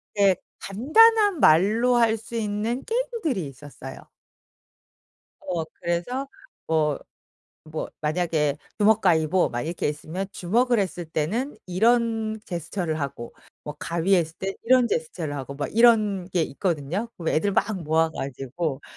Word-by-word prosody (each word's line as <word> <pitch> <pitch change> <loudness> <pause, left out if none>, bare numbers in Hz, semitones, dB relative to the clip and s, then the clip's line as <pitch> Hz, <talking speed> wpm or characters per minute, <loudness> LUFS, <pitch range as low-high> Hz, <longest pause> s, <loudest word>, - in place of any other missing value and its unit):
이게 200 -2 +4 0.2
간단한 405 - +4
말로 215 +10 +4
할 230 -2 +4
수 230 +2 -10
있는 220 +3 -2
게임들이 450 - -1
있었어요. 135 -1 -11 1.4
어 175 -3 -1 0.2
그래서 175 +11 -2 0.4
뭐 155 -3 +1 0.7
뭐 155 0 -5
만약에 155 -2 0 0.2
주먹가위보 185 -5 +3
막 120 0 -3
이렇게 165 0 -2
있으면 160 +6 -4
주먹을 235 +7 +1
했을 180 -3 -2
때는 195 - -2
이런 225 +3 +1
제스처를 170 -1 -3
하고 130 -4 -5 0.3
뭐 150 - -6
가위했을 170 -1 +1
때 195 0 -3
이런 255 0 +5
제스처를 160 -5 -3
하고 140 0 -6
막 145 +6 -5
이런 215 -5 +4
게 180 -3 +1
있거든요. 170 +6 -2
그럼 165 -2 -4
애들 200 +6 +1
막 - - +2 0.2
모아 160 +1 +2
가지고 135 +1 -4
180 Hz, 275 characters per minute, -25 LUFS, 155-225 Hz, 1.4 s, 이런